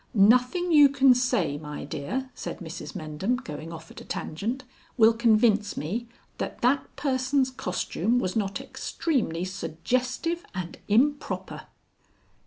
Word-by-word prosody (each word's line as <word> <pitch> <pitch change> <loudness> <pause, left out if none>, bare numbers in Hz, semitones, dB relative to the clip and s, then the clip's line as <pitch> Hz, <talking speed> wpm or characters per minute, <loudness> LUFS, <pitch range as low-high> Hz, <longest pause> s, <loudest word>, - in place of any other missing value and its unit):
"Nothing 250 - +4
you 295 -3 +8
can 270 -1 +6
say, 245 - 0
my 150 -2 -6
dear," 255 - -4
said - - -6
Mrs 160 -3 -8
Mendham, 155 +9 -1
going 160 - -7
off 165 -1 -10
at - - -10
a - - -9
tangent, 230 - -4 0.3
"will 225 -1 +7
convince 220 -2 +3
me 220 +11 -3 0.3
that - - -4
that 265 +3 +3
person's 265 -1 +1
costume 215 0 -1
was 185 -7 -1
not 200 -3 -1
extremely 210 - -2
suggestive 250 - -2
and 180 -2 -5
improper." 280 +7 0
230 Hz, 130 wpm, -27 LUFS, 170-260 Hz, 0.3 s, you